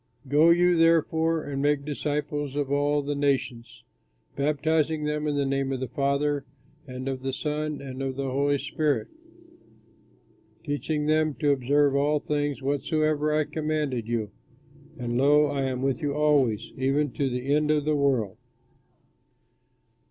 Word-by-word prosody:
Go 150 +5 +5
you, 175 +1 +4
therefore, 165 -1 +2
and 140 -1 -4
make 145 -1 +1
disciples 145 -1 -3
of 145 -2 -2
all 145 +1 +1
the 145 +1 -2
nations, 125 -5 -2 0.5
baptizing 155 +2 0
them 150 0 -1
in 145 - 0
the 140 -1 +1
name 135 0 -1
of 130 - -2
the 130 - -3
Father 140 +2 0 0.4
and 130 0 -6
of 130 -1 -3
the 135 0 -2
Son 150 +2 -3
and 135 -1 -7
of 135 -1 -3
the 135 -1 -3
Holy 140 +2 +1
Spirit, 145 -5 -1 1.5
teaching 150 0 -2
them 155 -1 +2
to 145 -1 +1
observe 140 +1 +2
all 145 +2 +2
things 145 -2 -2
whatsoever 150 +2 0
I 155 0 +2
commanded 150 -7 -2
you; 115 -3 -2 0.7
and, 120 -1 -2
lo, 145 +2 +5
I 140 -2 -1
am 130 -1 -2
with 135 +3 0
you 145 -2 -1
always, 145 -8 +1
even 135 +2 +1
to 140 +1 -1
the 125 +3 -1
end 150 0 +2
of 150 -1 +2
the 155 0 +2
world." 125 -8 0
145 Hz, 150 wpm, -26 LUFS, 135-150 Hz, 1.5 s, Go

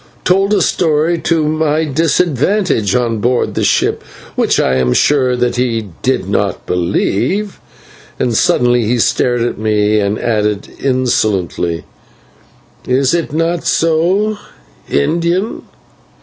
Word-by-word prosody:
told 195 +2 +2
a 200 -4 +3
story 160 +1 +1
to 160 -2 0
my 155 0 0
disadvantage 155 - +1
on 120 -3 0
board 120 +3 0
the - - -1
ship, - - +1 0.3
which - - +1
I 65 - +1
am 65 -1 +1
sure 130 -4 +2
that 125 0 -1
he 115 -4 -1
did - - 0
not - - -1
believe," 100 - -1 0.6
and 120 -2 -1
suddenly 120 +2 +2
he 120 +3 +1
stared 120 +1 +1
at 120 - -3
me 105 0 +1
and 100 +1 0
added 105 -3 -1
insolently: 105 -10 0 1.0
"Is 130 +2 +2
it 170 -4 -1
not 165 +2 -1
so, 180 +6 +1 0.5
Indian?" 170 - 0
130 Hz, 120 wpm, -14 LUFS, 110-165 Hz, 1.0 s, a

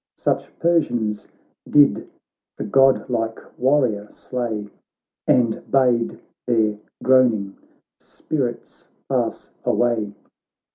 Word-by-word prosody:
Such - - -2
Persians 120 -11 0 0.4
did 145 -1 +4 0.5
the - - -4
godlike 120 -2 +2 0.2
warrior 125 -7 +1
slay, 115 -5 -4 0.6
And 120 -3 +2
bade 125 -4 +2 0.3
their 110 -3 +1 0.2
groaning 120 -7 +3 0.4
spirits 125 -6 -5 0.2
pass - - -2
away. 115 -4 0
120 Hz, 80 wpm, -22 LUFS, 110-130 Hz, 0.6 s, did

